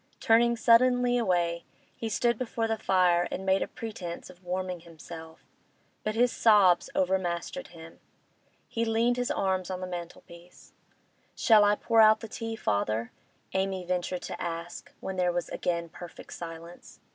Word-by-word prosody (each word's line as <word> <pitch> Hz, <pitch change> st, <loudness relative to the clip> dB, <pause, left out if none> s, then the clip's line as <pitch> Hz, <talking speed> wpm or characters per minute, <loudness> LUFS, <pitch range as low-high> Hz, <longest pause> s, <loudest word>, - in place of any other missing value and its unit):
Turning 235 Hz, 0 st, +4 dB
suddenly 245 Hz, +1 st, +4 dB
away, 175 Hz, -5 st, 0 dB, 0.3 s
he 225 Hz, -, -4 dB
stood 235 Hz, +3 st, +1 dB
before 230 Hz, -1 st, -2 dB
the 225 Hz, -, 0 dB
fire 180 Hz, -4 st, +2 dB
and 190 Hz, -, -5 dB
made 190 Hz, 0 st, +3 dB
a -, -, -1 dB
pretence 185 Hz, -6 st, -7 dB
of 180 Hz, +1 st, -21 dB
warming 180 Hz, 0 st, -3 dB
himself; 165 Hz, -1 st, -12 dB, 0.6 s
but 215 Hz, 0 st, -2 dB
his 245 Hz, +1 st, +3 dB
sobs 205 Hz, -6 st, +4 dB
overmastered 185 Hz, +5 st, -1 dB
him. 165 Hz, -1 st, -13 dB, 0.7 s
He 230 Hz, -, -2 dB
leaned 230 Hz, +2 st, +1 dB
his 245 Hz, +2 st, -1 dB
arms 190 Hz, -9 st, 0 dB
on 185 Hz, -1 st, -3 dB
the 185 Hz, -, -4 dB
mantel 175 Hz, -1 st, -7 dB
piece. 170 Hz, +1 st, -16 dB, 0.6 s
'Shall 220 Hz, -3 st, +5 dB
I 205 Hz, 0 st, +4 dB
pour 225 Hz, +1 st, +3 dB
out 215 Hz, 0 st, +6 dB
the 225 Hz, -, -6 dB
tea, 225 Hz, +1 st, -5 dB
father?' 110 Hz, -, -1 dB, 0.4 s
Amy 190 Hz, -1 st, -1 dB
ventured 180 Hz, 0 st, -2 dB
to -, -, -6 dB
ask, 170 Hz, 0 st, -5 dB
when 190 Hz, -1 st, -5 dB
there 180 Hz, -1 st, +2 dB
was 175 Hz, -1 st, -3 dB
again 170 Hz, -1 st, -2 dB
perfect 175 Hz, +1 st, -11 dB
silence. 170 Hz, 0 st, -10 dB
185 Hz, 155 wpm, -28 LUFS, 175-225 Hz, 0.7 s, out